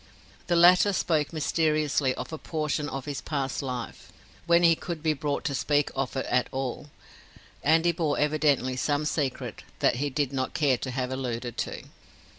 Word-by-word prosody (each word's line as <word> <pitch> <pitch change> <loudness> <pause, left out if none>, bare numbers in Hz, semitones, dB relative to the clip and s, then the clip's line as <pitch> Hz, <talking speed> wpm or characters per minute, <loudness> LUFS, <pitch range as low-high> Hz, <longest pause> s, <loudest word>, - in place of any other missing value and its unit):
The 175 - +2
latter 180 +4 +6
spoke 155 -5 +1
mysteriously 155 -3 +1
of - - -6
a 160 - -5
portion 150 -2 -2
of 135 -1 -5
his 145 -2 -4
past 135 -3 -2
life 125 -3 -6 0.4
when 170 0 +5
he 165 -1 +7
could 165 -1 -6
be 155 -1 +2
brought 145 0 -2
to 140 - -1
speak 145 +2 +1
of 135 -1 -2
it 135 - -1
at 125 - +1
all 135 +2 -4 0.7
and 160 +4 +4
he 175 - +5
bore 160 -3 -1
evidently 145 -4 +2
some 145 +3 0
secret 145 -4 -2 0.2
that - - +2
he 145 +3 -1
did 140 0 -1
not 130 -1 -2
care 135 -5 +2
to 130 - -4
have 130 0 -2
alluded 120 -2 -3
to. - - -3
145 Hz, 180 wpm, -27 LUFS, 130-155 Hz, 0.7 s, he